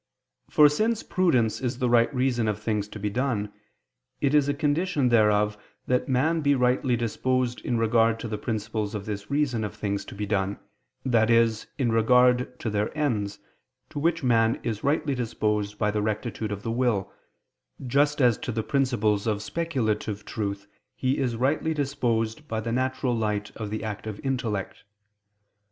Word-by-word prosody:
For 150 - +7
since 215 +10 0
prudence 130 -13 +1
is 125 -2 -2
the 125 - 0
right 120 +1 +4
reason 125 -4 +1
of 105 -1 -1
things 105 -2 -1
to 105 - -9
be 105 0 -2
done, 110 -4 -1 0.7
it 140 0 +1
is 145 -1 +4
a - - +2
condition 150 -1 +1
thereof 105 -2 +3 0.3
that 125 +2 0
man 155 +6 +2
be 145 -1 +3
rightly 125 0 +2
disposed 125 +2 -1
in 120 - -1
regard 115 0 +3
to - - -4
the 105 -1 -4
principles 110 -1 -3
of 100 -1 -5
this 105 -1 -5
reason 140 -6 0
of 105 - -5
things 100 -1 -2
to - - -10
be 105 +1 -3
done, 100 -1 -1 0.5
that 115 -3 +3
is 115 -2 +3
in 125 -4 +1
regard 125 +2 +3
to 110 - -2
their 105 0 0
ends, 105 -9 -1 0.5
to 145 - -4
which 165 +1 +1
man 115 -2 +3
is 110 -3 -3
rightly 145 0 +1
disposed 105 -4 -1
by 105 0 +1
the 105 0 -1
rectitude 110 0 -3
of 100 0 -5
the 115 - -2
will, 115 -5 0 0.7
just 145 +4 +2
as 120 -4 +4
to 125 - -4
the 110 -1 -2
principles 115 -7 +1
of 105 -1 0
speculative 110 -9 -2
truth 100 -2 -4 0.3
he 130 +2 0
is 125 -4 0
rightly 145 +6 0
disposed 130 -2 -1
by 110 - -2
the 115 +1 -3
natural 130 0 0
light 105 -2 -1
of 110 -2 -5
the 110 +1 -4
active 110 -1 -5
intellect. 120 -7 -3
115 Hz, 175 wpm, -26 LUFS, 105-130 Hz, 0.7 s, For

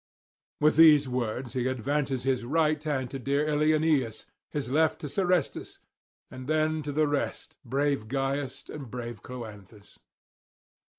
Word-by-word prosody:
With 150 +1 +3
these 150 -3 +7
words 125 0 -3
he 125 -1 0
advances 130 +1 -1
his 130 -2 0
right 155 +3 +1
hand 135 -5 -2
to 135 - -5
dear 140 +3 0
Ilioneus, 150 -5 +2 0.2
his 145 -3 -3
left 155 +4 +2
to 150 - -4
Serestus; 180 +3 -1 0.5
then 155 +4 0
to 145 0 -4
the 155 +2 +2
rest, 145 -1 -3
brave 140 -2 0
Gyas 135 +1 -2
and 140 -5 -7
brave 120 -1 -6
Cloanthus. 105 -4 -10
140 Hz, 130 wpm, -28 LUFS, 125-150 Hz, 0.5 s, these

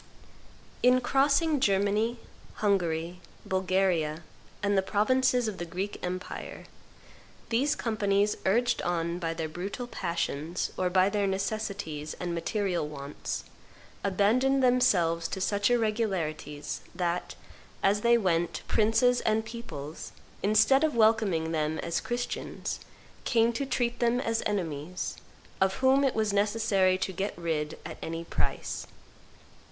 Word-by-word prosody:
In 250 +1 +5
crossing 280 +4 +2
Germany, 210 +1 +2 0.4
Hungary, 175 -4 0 0.2
Bulgaria, 185 -4 +1 0.4
and 205 0 +2
the 195 - +4
provinces 245 +5 +2
of 210 -3 -4
the - - -2
Greek 185 +4 -4
empire, 185 +1 -5 0.8
these 270 +6 +2
companies, 205 -2 +1
urged 240 +5 +2
on 170 0 -1
by 165 -2 -2
their 160 -1 -2
brutal 195 +9 -5
passions 170 -5 -2
or 185 -1 0
by 185 +1 +4
their 200 -1 0
necessities 195 -6 -3
and 175 -1 -4
material 180 -1 -1
wants, 140 -1 -5 0.6
abandoned 240 +8 +3
themselves 180 -10 +3
to 190 - -5
such 205 +2 +1
irregularities 190 -11 -1
that, 175 -1 -2 0.5
as 205 +1 +3
they 235 +1 +5
went, 175 -5 0
princes 225 +3 +3
and 220 0 +1
peoples, 165 -11 -7 0.3
instead 215 +7 +4
of 310 -4 +1
welcoming 215 -8 +3
them 155 -1 0
as 170 0 -2
Christians, 245 0 -4 0.4
came 230 0 +3
to 275 +4 -2
treat 240 -2 -1
them 240 0 +2
as 230 -3 0
enemies, 175 -4 -3 0.4
of 190 0 +3
whom 265 +1 +4
it 270 - +2
was 215 -2 +1
necessary 200 -2 +2
to 190 0 -2
get 195 +1 -3
rid 160 -3 -2
at - - -7
any 165 +1 -4
price. - - -3
200 Hz, 125 wpm, -29 LUFS, 170-230 Hz, 0.8 s, In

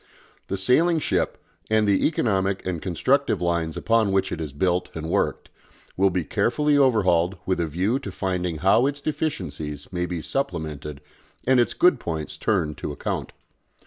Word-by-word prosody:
The 95 - -2
sailing 155 - +3
ship, 155 - 0 0.3
and 110 -1 +3
the 100 -1 +3
economic 100 -10 0
and 90 -4 -2
constructive 125 - +1
lines 85 -2 -1
upon 115 -3 +2
which 95 0 +1
it 80 - -3
is 75 -3 -4
built 90 +5 0
and 80 -1 -4
worked, - - -1 0.4
will 95 +1 +3
be 90 -1 -1
carefully 150 - +1
overhauled 95 -10 +3
with 95 -2 0
a 85 - 0
view 95 - 0
to 140 - -7
finding 90 -3 -2
how 115 +7 +5
its 145 0 -3
deficiencies 90 - -4
may 90 0 -1
be 85 -3 -4
supplemented 75 - -3 0.4
and 130 0 +4
its 120 - +1
good 180 - +4
points 80 -2 -4
turned 75 -2 0
to - - -4
account. 70 - -4
95 Hz, 165 wpm, -24 LUFS, 85-120 Hz, 0.4 s, how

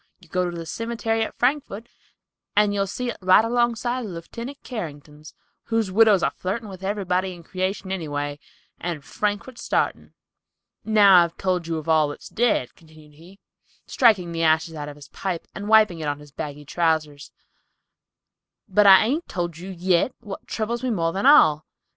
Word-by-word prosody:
You - - -20
go 180 -1 -1
to 170 - -7
the 165 - -6
cimetery 230 +3 -2
at 220 - -3
Frankford, 245 -4 -1 0.7
and 205 0 +3
you'll 195 -1 0
see 240 +5 -3
it - - -10
right 185 +4 +5
along 240 0 +1
side 245 +2 -3
of 215 - -6
Leftenant 230 +10 -8
Carrington's, 150 - -8 0.3
whose 225 -4 -1
widow's 210 -2 +5
a - - +2
flirtin' 205 +4 -4
with 190 -1 -10
everybody 190 -2 -1
in 170 - -14
creation 185 +2 -3
anyway, 145 -5 -3 0.4
and 165 -5 -5
Frankford 210 - -3
sartin." - - -2 0.7
"I've 220 - -6
now 195 -5 +7
told 180 0 -2
you 165 -1 -2
of 155 - -7
all 155 -2 +4
that's 145 - -9
dead," 225 - 0
continued 155 -2 -19
he, 170 +6 -16 0.5
striking 200 -9 +3
the 165 0 -3
ashes 160 0 +2
out 150 -2 -6
of 145 - -10
his 145 -1 -14
pipe 185 -4 -4
and 205 0 -6
wiping 215 -6 +5
it 155 - -4
on 145 -1 -1
his 145 -1 -15
bagging 145 0 -7
trousers, 155 -2 -1 1.4
"but 205 +1 +4
I 190 -1 +9
hain't 285 +10 -1
told 175 -3 -4
you 185 +2 -8
yit 185 +5 0
what 200 -2 -9
troubles 235 +2 -3
me 255 - -1
more 165 -7 0
than 195 +7 +1
all. 155 - +6
185 Hz, 180 wpm, -23 LUFS, 160-220 Hz, 1.4 s, I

